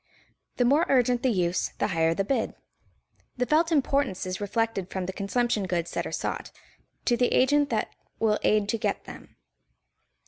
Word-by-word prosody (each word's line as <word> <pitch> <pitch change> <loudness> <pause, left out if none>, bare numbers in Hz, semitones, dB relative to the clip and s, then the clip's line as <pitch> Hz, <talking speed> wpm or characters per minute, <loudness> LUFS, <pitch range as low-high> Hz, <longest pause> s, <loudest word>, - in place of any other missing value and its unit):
The 245 - +3
more 285 +7 +3
urgent 250 -2 +3
the 260 - +2
use, 180 -5 0
the - - 0
higher 165 -2 +1
the 195 - 0
bid. 270 +7 -1 0.8
The 250 - +1
felt 320 +5 +2
importance 275 - +1
is 185 +2 -4
reflected 205 -2 -1
from 190 -2 -3
the 190 - -4
consumption 210 +1 0
goods 170 -2 -2
that - - -2
are - - -7
sought, - - -3 0.5
to 240 - +3
the 245 +1 +2
agent 290 +2 +3
that - - -1 0.2
will 215 -1 +1
aid 210 -1 +2
to 230 - 0
get - - -1
them. - - -12
225 Hz, 175 wpm, -27 LUFS, 190-260 Hz, 0.8 s, The